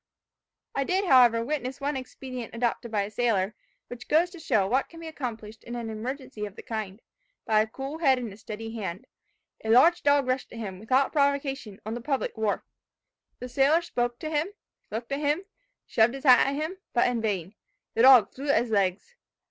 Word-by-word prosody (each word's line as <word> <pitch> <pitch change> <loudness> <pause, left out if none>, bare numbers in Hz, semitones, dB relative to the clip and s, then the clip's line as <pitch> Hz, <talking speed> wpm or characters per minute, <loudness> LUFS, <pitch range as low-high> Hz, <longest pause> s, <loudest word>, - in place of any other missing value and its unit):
"I 275 - 0
did, 375 +7 0
however, 245 -6 +5
witness 270 -2 -3
one 285 +1 -2
expedient 255 -2 -7
adopted 235 0 -1
by 210 -2 0
a 200 - -6
sailor, 215 -3 +1 0.3
which 245 0 -9
goes 335 +4 +3
to 355 - -11
show 215 -10 +2
what 255 +7 0
can 330 - -12
be 330 - -9
accomplished 225 -8 -6
in 240 - -7
an 230 -2 -4
emergency 250 +1 -6
of 200 - -13
the - - -10
kind, 215 -2 -5 0.4
by 215 -2 +4
a 220 - -1
cool 270 +7 -6
head 270 -5 +4
and 235 -5 -5
a - - -14
steady 225 +1 -7
hand. 195 -5 -5 0.6
A 220 - -4
large 320 +10 +6
dog 285 -1 +3
rushed 255 +1 -2
at - - -8
him, 195 -5 -6
without 255 +6 +1
provocation, 280 -7 0
on 220 - -3
the 240 - -5
public 275 +1 -2
wharf. 220 -2 -1 0.7
The 250 - -7
sailor 275 +7 +3
spoke 240 -7 -2
to 310 - -4
him, 305 +2 +1 0.4
looked 230 +4 -5
at 275 - -1
him, 300 +5 0 0.4
shoved 230 +3 +3
his 270 - -8
hat 255 -3 +7
at 275 - -1
him, 315 +6 -3 0.2
but 240 - +3
in 245 -2 -1
vain. 195 -4 -2 0.4
The 230 - +1
dog 250 -5 +7
flew 280 +2 -6
at 280 - +4
his 235 - -8
legs. 200 - 0
245 Hz, 205 wpm, -27 LUFS, 220-280 Hz, 0.7 s, hat